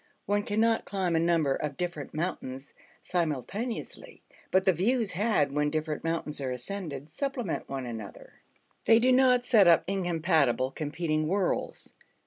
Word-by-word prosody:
One 205 +1 +1
cannot 220 +2 +1
climb 185 -4 -1
a - - +3
number 165 -4 +2
of 145 0 -4
different 175 -5 -4
mountains 140 -5 -4 0.3
simultaneously, 180 - -3 0.3
but 190 0 +2
the 190 - +5
views 220 +5 +1
had 185 -6 +1
when 150 +1 +1
different 155 0 -3
mountains 165 -3 -3
are 130 - -2
ascended 145 +2 -6
supplement 250 - -3
one 135 -2 -4
another: 110 -4 -9 0.4
they 225 - +7
do 250 +3 +3
not 250 -1 +4
set 215 -7 +5
up 170 -1 +6
incompatible, 160 - +1
competing 155 +1 -2
worlds. 190 +1 -2
170 Hz, 140 wpm, -28 LUFS, 150-200 Hz, 0.4 s, they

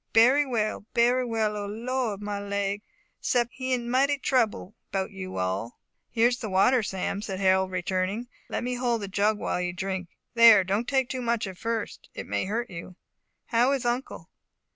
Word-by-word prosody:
"Berry 260 +6 +6
well 215 -4 -1
berry 245 +2 +4
well 220 -3 0
O 205 -1 -4
Lord 225 -1 -2
my 205 -1 -3
leg! 200 0 -2 0.4
'sept 240 -1 +1
he 260 0 -4
in 245 -2 0
mighty 275 +4 +2
trouble 230 -7 0 0.2
'bout 190 +1 -1
you 190 -1 -7
all." 95 +6 -2 0.3
"Here 230 +1 +3
is 245 0 -3
the 220 - -4
water, 230 +7 +4
Sam," 195 0 -3
said 195 -3 -4
Harold 190 -1 +3
returning, 185 +5 -2 0.2
"let - - -2
me 250 +1 -1
hold 240 -3 0
the - - -3
jug 205 +2 +1
while 180 - -2
you 180 0 -2
drink. 185 0 -4 0.2
There, 230 -4 +8
don't 200 +6 -1
take 265 -2 +2
too 255 0 -4
much 235 -2 0
at 190 -2 -8
first 230 0 -4
it - - -5
may - - -1
hurt 230 +4 -2
you. 175 +1 -8 0.5
How 245 +3 +3
is 265 -3 -2
uncle?" 240 +2 -3
215 Hz, 185 wpm, -27 LUFS, 195-245 Hz, 0.5 s, There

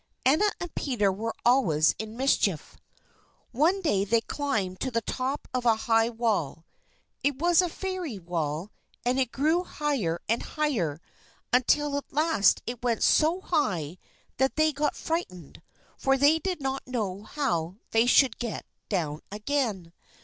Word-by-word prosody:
Anna 315 +11 +4
and 350 -2 -6
Peter 220 -8 0
were 225 +4 -4
always 180 - +4
in 220 +1 -6
mischief. 210 - +1 0.8
One 335 +10 +2
day 200 - +2
they 225 +3 +2
climbed 215 -11 -2
to 265 - -1
the 230 -2 -1
top 265 +5 -3
of 255 -1 -1
a 230 -2 +4
high 225 0 +3
wall. 215 - -1 0.6
It 285 -1 +1
was 345 +3 +4
a 360 - -1
fairy 365 - -4
wall, 170 0 -3 0.3
and 250 +2 +1
it 255 -3 0
grew 315 +6 +1
higher 270 - -2
and 230 +2 +1
higher, 220 - -1 0.5
until 280 +4 +3
at 285 - -7
last 300 - +3
it 240 0 -5
went 240 -2 0
so 330 +4 +3
high 180 - -1 0.4
that 265 +1 +1
they 310 0 +3
got 295 +1 -1
frightened, 185 - -4 0.4
for 270 0 +2
they 290 +4 +4
did 370 -1 -3
not 270 0 -3
know 205 -6 -3
how 210 - -2 0.2
they 225 +2 +3
should 260 +1 +4
get 235 -3 -4 0.2
down 160 -6 -2
again. 210 -6 -2
245 Hz, 150 wpm, -27 LUFS, 195-295 Hz, 0.8 s, Anna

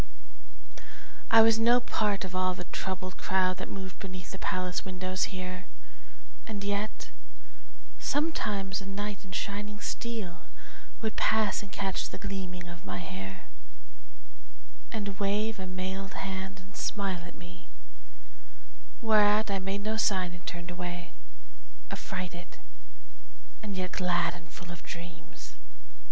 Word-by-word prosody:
I 225 0 +10
was 225 0 +7
no 240 +2 +7
part 210 -5 +1
of 185 - -5
all 185 0 +3
the 180 - -4
troubled 185 -1 -2
crowd 185 -1 +3
That - - -4
moved 190 -1 -5
beneath 185 -2 -6
the 190 - -5
palace 185 -1 +1
windows 185 0 0
here, 185 -1 -4 0.8
And 205 -3 -3
yet 205 +1 -1 0.9
sometimes 210 -11 +1
a 195 - -7
knight 205 +1 -2
in 190 - -10
shining 205 +3 -2
steel 225 -7 -3 0.5
Would 220 -1 0
pass 220 -2 +4
and 200 -2 -9
catch 195 0 0
the - - -5
gleaming 185 -4 -3
of 175 -1 -8
my 95 -1 -3
hair, 95 +1 -5 1.5
And 200 -3 -2
wave 210 +2 +2
a 190 - -3
mailed 190 +1 -2
hand 190 -1 -3
and 185 +2 -13
smile 195 -4 0
at 175 - -9
me, 175 0 -11 1.4
Whereat 215 -1 +6
I 195 - +2
made 195 +2 -1
no 220 +1 +1
sign 185 -5 +3
and 175 -1 -11
turned 175 0 -4
away, 175 -1 -4 0.8
Affrighted 175 -1 -4 1.0
and 205 -3 -3
yet 185 -1 -1
glad 175 -2 +3
and 165 -3 -10
full 175 +1 -8
of 170 - -7
dreams. 170 -1 -8
190 Hz, 135 wpm, -31 LUFS, 180-205 Hz, 1.5 s, I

